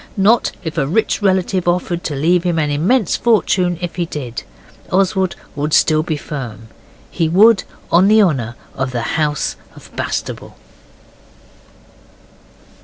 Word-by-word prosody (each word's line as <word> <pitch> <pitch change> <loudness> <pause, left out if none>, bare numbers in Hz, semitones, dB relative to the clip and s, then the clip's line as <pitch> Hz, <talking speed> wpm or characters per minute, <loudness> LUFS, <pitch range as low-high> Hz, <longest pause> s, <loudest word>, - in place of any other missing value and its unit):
Not 210 +5 +3
if 160 0 -3
a 135 - 0
rich 215 +7 0
relative 185 -2 +1
offered 175 0 0
to 150 - -2
leave 170 +5 +2
him 175 -2 0
an 150 -2 0
immense 185 - +1
fortune 185 -6 +1
if 175 0 -5
he 175 -1 -1
did. 125 -8 -5 0.5
Oswald 190 0 +1 0.2
would 150 +1 0
still 155 -1 +4
be 155 -1 -3
firm. 120 -8 -7 0.4
He 165 -2 0
would, 205 +5 +5 0.3
on 180 +3 +5
the 215 +1 +5
honour 125 - -1 0.2
of 130 -1 -3
the 120 -2 -2 0.2
House 150 -1 -1 0.2
of - - -15
Bastable. - - -4
170 Hz, 140 wpm, -17 LUFS, 150-190 Hz, 0.5 s, would